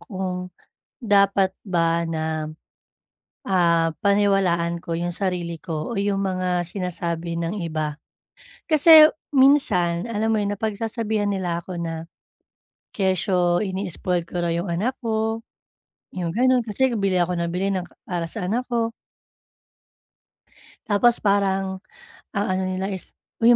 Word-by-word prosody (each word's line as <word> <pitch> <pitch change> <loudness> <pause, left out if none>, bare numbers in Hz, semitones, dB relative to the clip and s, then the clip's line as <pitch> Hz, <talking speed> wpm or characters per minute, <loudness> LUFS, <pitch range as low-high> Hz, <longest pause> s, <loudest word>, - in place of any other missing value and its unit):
kung 185 -3 -4 0.5
dapat 200 -3 +3
ba 170 -3 +1
na, 160 -1 -2 1.0
ah, 170 -3 +2
paniwalaan 195 -4 +2
ko 170 -1 -5
yung 175 +1 -2
sarili 175 -2 -2
ko 160 +1 -5
o 230 - -3
yung 200 0 0
mga 185 -2 0
sinasabi 170 -2 -3
ng 170 +5 -3
iba. 155 -4 -3 0.7
Kasi 310 0 +8 0.3
minsan, 230 -10 +3
alam 220 0 0
mo 215 - +2
yun, 205 0 -1
napagsasabihan 220 0 -2
nila 180 -4 -1
ako 180 +1 -8
na, 165 -1 -5 0.8
kesyo 185 -2 +1
ini-spoil 185 -3 -2
ko 175 0 -4
raw 170 - 0
yung 170 +1 -1
anak 230 +10 -1
ko, 225 0 -1 0.7
yung 175 -2 -2
ganun, 255 +4 +3
kasi 230 +4 +1
nga 245 - -2
bili 195 -3 +1
ako 180 +1 +1
nang 170 0 -2
bili 185 +3 -1
ng 190 -2 -1
ka 175 - -18
para 170 -2 -3
sa 195 -5 -4
anak 235 +6 0
ko. 230 -1 0 1.9
Tapos 235 +2 +3
parang 195 -2 0 0.6
ang 200 +1 +1
ano 190 0 -1
nila 190 +2 -2
is, 190 -2 -6 0.3
"Uy 235 +1 +7
190 Hz, 135 wpm, -23 LUFS, 170-210 Hz, 1.9 s, Kasi